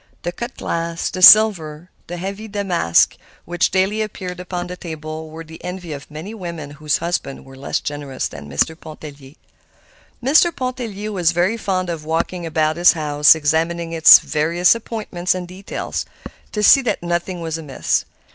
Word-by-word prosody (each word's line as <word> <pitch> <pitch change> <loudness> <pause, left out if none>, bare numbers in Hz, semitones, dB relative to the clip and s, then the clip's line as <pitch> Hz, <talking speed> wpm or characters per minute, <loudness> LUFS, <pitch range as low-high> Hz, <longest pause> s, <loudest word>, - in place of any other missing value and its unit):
The 175 - -2
cut 235 +8 -7
glass, 165 0 -3
the 185 - -5
silver, 180 -6 +6 0.2
the 175 - -6
heavy 195 +4 -6
damask 195 - +1 0.3
which 175 0 0
daily 195 +3 0
appeared 185 -4 -6
upon 180 -1 -5
the 180 0 -7
table 160 -2 -7
were 160 +1 -9
the 160 0 -13
envy 180 -3 -6
of 140 0 -10
many 160 +8 -8
women 170 -8 -7
whose 150 +1 -1
husbands 170 -5 -3
were 135 0 -14
less 135 +1 -3
generous 145 -3 -4
than 75 0 -11
Mr. 75 - 0
Pontellier. 150 -3 -12 0.9
Mr. 315 +6 +4
Pontellier 235 -5 -4
was 175 -4 +1
very 180 +6 +1
fond 185 -5 -2
of 160 -2 -6
walking 165 +2 -2
about 155 0 0
his 175 +1 +6
house 150 -2 +4
examining 165 +2 -1
its 160 -1 +9
various 165 +4 +2
appointments 210 -6 -3
and 180 -1 -5
details, 185 +2 -5 0.4
to 210 - -2
see 275 - +7
that 245 -8 -2
nothing 175 +1 -2
was 165 -1 -4
amiss. 145 -4 -1
170 Hz, 165 wpm, -19 LUFS, 155-190 Hz, 0.9 s, its